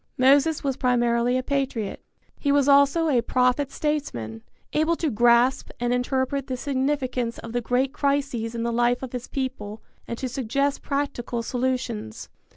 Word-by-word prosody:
Moses 280 +4 +4
was 270 -2 -1
primarily 240 -1 +2
a 255 - -1
patriot. 265 -7 -2 0.4
He 285 - +1
was 285 -1 +3
also 280 +4 +5
a 260 -6 +3
prophet 250 +3 +1
statesman, 120 - -3 0.3
able 315 +2 +2
to 320 -3 -1
grasp 240 +3 +3
and 240 0 0
interpret 260 +2 -1
the 255 - -3
significance 260 -3 -1
of 230 - -8
the 245 - 0
great 255 +3 0
crises 275 -6 -1
in 230 - -2
the 235 0 -1
life 240 +2 +1
of 260 - -5
his 250 0 -5
people 255 -6 -4 0.3
and 235 - -4
to 260 - -3
suggest 275 +3 -1
practical 275 -4 -2
solutions. 245 - -3
255 Hz, 160 wpm, -24 LUFS, 240-280 Hz, 0.4 s, also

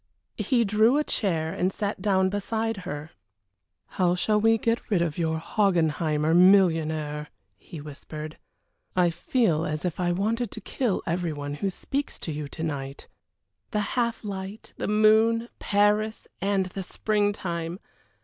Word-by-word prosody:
He 235 +3 +2
drew 215 +6 +4
a 300 - +2
chair 165 - -1
and 185 -1 0
sat 205 +1 -3
down 190 -2 +3
behind 220 +2 -2
her. 145 +2 -5 0.7
"How 180 - +1
shall 210 +3 +1
we 225 +1 +5
get 230 +2 -1
rid 200 -5 +3
of 170 -1 -1
your 160 -1 0
Hogginheimer 160 -4 +1
millionaire?" 160 -5 +4 0.3
he 165 - -10
whispered. 150 +1 -8 0.6
"I 180 -2 +4
feel 165 -3 +1
as 155 +3 -3
if 175 -1 -2
I 175 -1 +1
wanted 220 +6 0
to 220 - -8
kill 225 0 -1
every 170 -1 -1
one 145 -1 -5
who 195 +7 -1
speaks 275 +9 -3
to 160 - -5
you 150 -1 -4
to 160 +3 -7
night." 140 -3 -4 0.6
The 210 - 0
half 235 -2 0
light, 195 +1 -6
the - - -3
moon, 220 +2 +4
Paris, 210 +2 +1
and 195 -1 +1
the 185 +1 -6
spring 205 +2 0
time! 170 -3 -4
190 Hz, 150 wpm, -26 LUFS, 160-215 Hz, 0.7 s, we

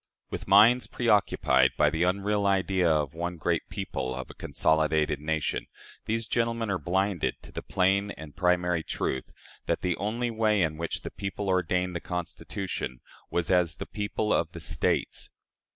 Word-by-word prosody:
With - - -5
minds 110 +6 +6
preoccupied 95 - +3
by 75 0 +4
the 80 +1 -2
unreal 100 +3 +1
idea 95 -2 +2
of 75 -3 +1
one 85 +1 -4
great 80 - -1
people 65 0 -3
of 65 - -6
a - - -12
consolidated 80 -1 +1
nation, 80 0 -1 0.4
these 115 +1 -1
gentlemen 115 -2 0
are 95 - 0
blinded 95 +3 0
to - - -12
the - - -5
plain 95 +2 +1
and 80 -6 -9
primary 90 -2 +2
truth 65 -4 -3 0.4
that - - 0
the 90 -2 0
only 115 +4 -1
way 110 -3 +2
in 80 -1 -1
which 85 +1 -3
the - - -6
people 100 0 -4
ordained 90 0 +1
the 85 - -3
Constitution 90 -5 -4 0.3
was 85 +1 -1
as 90 -3 +3
the - - -6
people 105 0 -1
of - - +2
States. 75 -1 -1
90 Hz, 160 wpm, -28 LUFS, 80-100 Hz, 0.4 s, minds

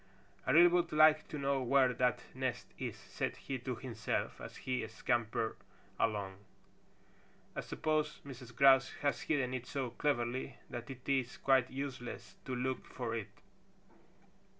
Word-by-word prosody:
"I - - +4
really 170 +4 +9
would 175 0 +2
like 155 0 +6
to 150 - -5
know 140 -1 +1
where 130 0 +4
that 125 0 +1
nest 130 -2 -2
is," - - -3
said - - -3
he 135 -1 -4
to 125 +1 -3
himself 120 0 -3
as - - -8
he 125 -1 -1
scampered 115 -2 -1 0.4
along. 100 -3 0 1.2
"I - - -2
suppose 155 -1 -1
Mrs. 125 -3 -9
Grouse 135 0 +6
has 145 - +1
hidden 135 -5 0
it 130 -1 -4
so 130 -4 -2
cleverly 125 -2 -1
that 120 +1 -6
it 130 -1 -9
is 130 -3 +1
quite 135 -2 +3
useless 125 -6 -6
to 130 - -2
look 130 +1 -1
for 120 -3 -4
it." 110 -3 -3
130 Hz, 150 wpm, -35 LUFS, 120-140 Hz, 1.2 s, really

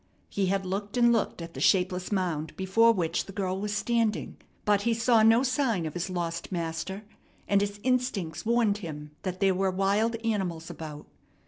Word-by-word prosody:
He 195 -2 0
had 195 +1 0
looked 200 +4 -3
and 235 -1 +5
looked 210 -6 -1
at 165 0 -9
the - - -7
shapeless 180 0 +2
mound 170 -6 -2
before 210 +5 +4
which 170 -5 -1
the - - -7
girl 190 -1 -2
was 210 0 -2
standing; 215 - 0 0.3
but 205 -1 +3
he 235 +1 +1
saw 230 0 +4
no 225 +3 +5
sign 255 - +1
of 155 - -4
his 175 +2 -3
lost 170 -1 -3
master, 170 +3 -3 0.4
and 200 0 +3
his 205 0 -2
instincts 250 -10 -1
warned 225 -3 +2
him 150 -5 -7
that 185 -1 -4
there 195 -1 +3
were 190 +1 +1
wild 200 +5 +1
animals 180 -7 -2
about. 150 -2 -8
195 Hz, 185 wpm, -28 LUFS, 175-220 Hz, 0.4 s, and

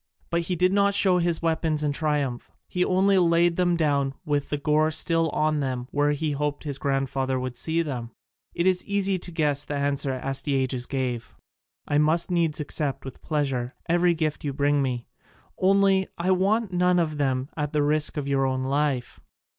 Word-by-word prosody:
But 170 0 +1
he 180 +2 -2
did 180 +2 +2
not 200 0 +3
show 190 -3 +3
his 170 -1 0
weapons 160 -2 0
in 145 - +1
triumph: 145 -4 -1 0.2
he 180 - 0
only 190 +1 +3
laid 170 0 +3
them 175 -1 +2
down 140 -4 +1
with 145 -2 -1
the 145 - -1
gore 150 +2 +2
still 165 +1 +1
on 155 +1 0
them 130 -3 -3
where 145 0 +2
he 150 +1 -2
hoped 145 0 -2
his 145 -3 -4
grandfather 135 -1 -1
would 125 -1 -4
see 165 +6 -1
them. 125 -6 -5 0.5
It 170 - 0
is 185 -1 +2
easy 195 -2 0
to 175 - -9
guess 150 -4 0
the 145 - -5
answer 140 -1 0
Astyages 130 -1 -2
gave: 125 -4 -3 0.5
"I 145 - +2
must 165 +4 +2
needs 165 -3 +1
accept 145 -2 -2
with 135 - -9
pleasure 135 -5 -2
every 175 +1 +3
gift 155 -2 -2
you 145 -2 -2
bring 145 +1 +2
me, 125 -3 -2 0.5
only 195 0 +3
I 180 +2 0
want 195 +2 +1
none 180 0 +3
of 155 -3 0
them 130 -1 0
at 150 -2 -2
the 150 -1 +1
risk 150 +1 +1
of 145 -2 -2
your 135 -1 +1
own 130 0 -1
life." 140 -2 -1
150 Hz, 185 wpm, -25 LUFS, 140-170 Hz, 0.5 s, not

